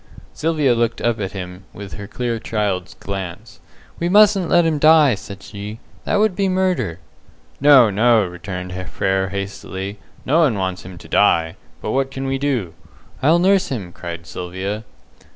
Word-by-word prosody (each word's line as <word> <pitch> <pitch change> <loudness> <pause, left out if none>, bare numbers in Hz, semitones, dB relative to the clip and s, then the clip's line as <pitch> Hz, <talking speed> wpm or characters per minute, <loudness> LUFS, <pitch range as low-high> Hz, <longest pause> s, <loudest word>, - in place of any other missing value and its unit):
Sylvia 150 -4 +1
looked 115 0 0
up 120 -2 0
at 95 -2 -3
him 90 0 -7
with 100 -1 -9
her 100 -1 -7
clear 120 +1 -3
child's 100 -5 -2
glance. 95 -3 -7 0.4
"We 170 - 0
mustn't 200 -2 +5
let 175 -1 +4
him 155 -2 +1
die," 155 -3 +6
said 100 0 -8
she. 105 +1 -7 0.3
"That - - 0
would 210 -2 +2
be 195 +1 +1
murder." 185 - 0 0.6
"No, 135 -6 +7
no," 110 +1 +4
returned 90 0 -6 0.2
Frere, 95 +3 0
hastily, 100 0 -5 0.3
"no 155 +5 +3
one 140 -10 +3
wants 95 -1 -2
him 90 0 -10
to - - -12
die. 80 -1 +3 0.3
But - - -2
what 135 +2 0
can 135 0 -5
we 135 0 -1
do?" 125 - -1 0.5
"I'll 155 +6 +5
nurse 190 +2 +3
him!" 100 -10 -5
cried 85 -1 -7
Sylvia. 95 +6 -5
105 Hz, 165 wpm, -20 LUFS, 95-145 Hz, 0.6 s, No